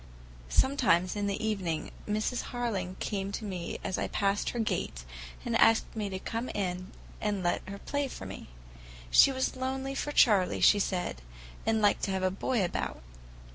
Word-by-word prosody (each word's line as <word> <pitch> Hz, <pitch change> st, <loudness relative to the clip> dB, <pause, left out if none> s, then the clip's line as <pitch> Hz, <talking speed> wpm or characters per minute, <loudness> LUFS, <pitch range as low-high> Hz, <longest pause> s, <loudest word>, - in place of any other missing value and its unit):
Sometimes 225 Hz, -10 st, +3 dB
in 205 Hz, -1 st, -1 dB
the 200 Hz, -, -1 dB
evening 180 Hz, -7 st, -2 dB, 0.2 s
Mrs. 215 Hz, +4 st, 0 dB
Harling 200 Hz, -7 st, -2 dB
called 195 Hz, -1 st, -2 dB
to 220 Hz, -, -5 dB
me 180 Hz, -4 st, -4 dB
as 185 Hz, -, -2 dB
I -, -, 0 dB
passed 200 Hz, 0 st, 0 dB
her -, -, -5 dB
gate, 60 Hz, -, -2 dB, 0.4 s
and -, -, 0 dB
asked 225 Hz, 0 st, +4 dB
me 210 Hz, -2 st, -2 dB
to 190 Hz, -, -3 dB
come 230 Hz, +6 st, -4 dB
in 185 Hz, -2 st, -3 dB, 0.3 s
and 205 Hz, -3 st, -1 dB
let 175 Hz, -, +1 dB
her 200 Hz, -, -5 dB
play 285 Hz, +6 st, -2 dB
for 170 Hz, -, -8 dB
me. 95 Hz, -, -8 dB, 0.6 s
She 275 Hz, -, +8 dB
was 260 Hz, 0 st, -1 dB
lonely 265 Hz, +1 st, -2 dB
for 295 Hz, +2 st, -2 dB
Charley, 205 Hz, -10 st, +4 dB
she 205 Hz, -, +6 dB
said, 180 Hz, -, -1 dB, 0.5 s
and 220 Hz, -1 st, +2 dB
liked 205 Hz, -, +4 dB
to 195 Hz, -, -2 dB
have 190 Hz, 0 st, -1 dB
a 185 Hz, -, +2 dB
boy 200 Hz, +2 st, 0 dB
about. 115 Hz, -, -3 dB
205 Hz, 175 wpm, -30 LUFS, 185-235 Hz, 0.6 s, She